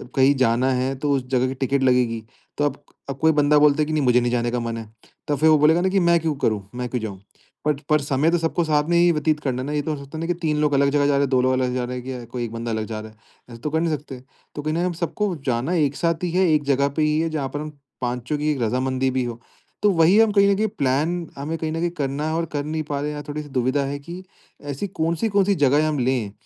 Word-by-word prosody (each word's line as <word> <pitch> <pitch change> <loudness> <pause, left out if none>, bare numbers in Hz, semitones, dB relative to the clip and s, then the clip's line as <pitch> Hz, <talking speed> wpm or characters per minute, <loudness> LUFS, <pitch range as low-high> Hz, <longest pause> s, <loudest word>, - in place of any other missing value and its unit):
कहीं 135 +1 +4
जाना 130 0 +2
है 130 +2 0
तो 145 -1 0
उस 130 -2 -3
जगह 130 -1 +2
की 130 - -3
टिकट 135 +1 0
लगेगी। 125 -3 +2 0.3
तो 145 - +1
अब 145 0 -3 0.3
अब, 135 - -4
कोई 160 +1 +4
बंदा 150 0 +3
बोलता 150 0 +4
है - - +2
कि 155 - -5
नहीं 150 - +1
मुझे 125 -1 +4
नहीं 120 0 0
जाने 120 -1 0
का 125 - -1
मन 115 -1 -3
है। 110 -2 -8 0.4
तो 145 - +1
फिर 155 +3 +3
वो 155 - +6
बोलेगा 160 +4 +4
ना 190 - +2
कि 195 +1 +2
मैं 170 -1 +4
क्यों 160 -1 -1
करूँ? 110 -6 0
मैं 125 0 -3
क्यों 125 -1 -2
जाऊँ? 100 -4 -6 0.5
बट 150 -2 +1
पर 150 -1 +3
समय 145 +3 +1
तो 175 - +3
सबको 165 +1 0
साथ 150 -2 +2
में 170 - +3
ही 175 0 +5
व्यतीत 155 -1 0
करना 130 -3 -2
है - - -4
ना। 145 - -4
ये 150 - 0
तो, 155 +1 -2
है 140 -1 -9
तो 160 - -8
नहीं 165 - -3
कि 175 - +1
3 155 -3 0
लोग 150 -1 +2
अलग 140 0 +3
जगह 145 0 +2
जा 145 - +3
रहे 140 - +2
हैं, 140 - +1
2 130 -2 +3
लोग 130 +1 +2
अलग 130 0 +1
जगह 125 - -3
जा 125 - -1
रहे 125 +1 -4
हैं 125 - -11
या 120 - -9
कोई 120 +1 -5
1 115 - -5
बंदा 115 0 -4
अलग 110 -1 -2
जा 110 -1 -5
रहा 110 - -8
है। 110 - -25 0.3
ऐसे 115 - -10
तो 150 - -2
कर 160 +2 0
नहीं 165 -1 0
सकते। 135 -3 -9 0.4
तो 145 - -4
कहीं 155 +1 -2
न - - -1
कहीं, 175 - +1
हम 180 - -1
सबको 185 +3 -2
जाना, 130 +6 0
एक 145 -5 +1
साथ 170 0 -1
ही 175 - -1
है, 185 +1 +3
एक 150 -1 +2
जगह 140 0 +2
पे - - +2
ही 155 0 +2
है, 165 0 0
जहाँ 145 -4 -3
पर 145 - -2
हम 155 - -5 0.3
पाँचों 125 +4 -2
की 150 +1 0
एक 135 -4 -2
रज़ामंदी 130 +3 0
भी 130 -1 0
हो। 120 -1 -5 0.4
तो 210 - +5
वही 175 +3 +5
हम 225 -2 +5
कहीं 200 -1 +4
भी 215 +2 +1
प्लान 160 0 -1
हमें 155 +4 -3
कहीं 160 -1 -3
न - - -3
कहीं 175 - +1
करना 140 +2 -1
है 155 - -1
और 165 0 0
कर 145 -1 -1
नहीं 155 +1 -2
पा 145 -1 -4
रहे 150 - -2
हैं, - - -4
यहाँ 145 0 -6
थोड़ी-सी 150 0 -5
दुविधा 130 +2 0
है 140 +1 -4
कि, 170 +5 -9 0.4
ऐसी 145 +7 -4
कौन-सी, 170 +4 -1
कौन-सी 200 -1 +2
जगहें 145 +3 +3
हम 150 -3 -1
लें, 125 -5 0
145 Hz, 305 wpm, -22 LUFS, 130-160 Hz, 0.5 s, वो